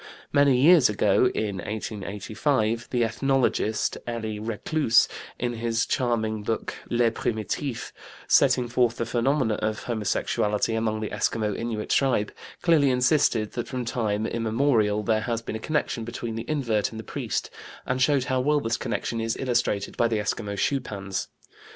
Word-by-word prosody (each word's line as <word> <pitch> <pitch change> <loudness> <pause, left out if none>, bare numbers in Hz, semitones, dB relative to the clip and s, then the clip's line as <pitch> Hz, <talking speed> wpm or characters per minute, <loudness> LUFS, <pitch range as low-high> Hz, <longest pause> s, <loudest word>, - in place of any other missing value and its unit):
Many 140 -2 +5
years 155 -3 +7
ago 105 +4 +3
(in 105 -3 -1
1885) 110 +4 -2
the 120 -2 +1
ethnologist, 115 -2 0
Elie 110 -3 -3
Reclus, 115 +4 +2 0.3
in 120 0 -2
his 115 0 0
charming 110 -4 0
book, 110 +2 -2 0.2
Les 120 -1 +3
Primitifs, 115 +4 -3 0.4
setting 125 -1 +4
forth 120 -1 +1
the 115 - -1
phenomena 120 -1 +1
of 110 0 -2
homosexuality 105 -1 0
among 110 -1 -1
the 110 - -4
Eskimo 105 -2 0
Innuit 115 -2 -4
tribe, 125 -6 +2 0.3
clearly 160 -5 +4
insisted 125 -4 +2
that 120 - -4
from 125 -2 -4
time 110 -3 -1
immemorial 115 -2 +1
there 110 +1 +1
has 115 +1 -2
been 110 - -5
a - - -3
connection 150 -3 -1
between 120 0 -5
the 115 +1 -6
invert 120 -9 0
and 110 - -8
the - - -6
priest, - - -3 0.3
and 130 0 -1
showed 135 0 +3
how 130 0 0
well 145 +3 +2
this 115 -3 -1
connection 115 -2 -2
is 115 0 -1
illustrated 120 -6 0
by 120 - +3
the 115 -1 0
Eskimo 105 0 -2
schupans. 100 -6 -2
115 Hz, 150 wpm, -26 LUFS, 110-125 Hz, 0.4 s, years